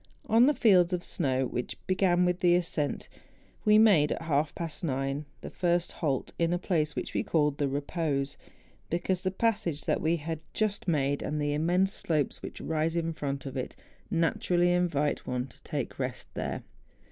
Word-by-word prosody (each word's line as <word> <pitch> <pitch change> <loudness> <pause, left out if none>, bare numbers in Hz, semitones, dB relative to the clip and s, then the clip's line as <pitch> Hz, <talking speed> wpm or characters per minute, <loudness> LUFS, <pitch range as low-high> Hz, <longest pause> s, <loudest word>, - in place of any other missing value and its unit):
On 230 +3 +5
the 295 - +3
fields 185 -6 +5
of 175 -1 -1
snow, 135 -7 0
which 125 0 -4
began 185 -1 +3
with 180 0 +1
the 175 -1 +4
ascent, 165 -4 -1 0.6
we 210 0 +6
made, 200 -10 +5
at - - -2
half 150 -1 0
past 165 -1 -5
nine, 135 0 -1 0.2
the - - -7
first 175 -1 0
halt 140 -6 -2
in 170 0 +2
a - - +2
place 165 -4 0
which - - -4
we - - +1
called 150 -3 +1
the 145 - +2
Eepose, 140 0 -1 0.5
because 180 +2 -1
the 185 - 0
passage 190 -7 0
that - - 0
we 160 +2 +2
had 160 0 -4 0.2
just 210 -3 -1
made, 145 -4 +1
and 150 - -2
the 145 0 0
immense 180 +6 +2
slopes 155 -4 -1
which - - -7
rise 160 +1 -1
in 165 -1 -1
front 140 -2 -4
of 135 -1 -6
it, 130 - -4 0.3
naturally 175 +1 +2
invite 165 -5 0
one 125 0 -1
to 135 - -15
take - - -4
rest - - -3
there. - - -3
165 Hz, 180 wpm, -29 LUFS, 145-180 Hz, 0.6 s, we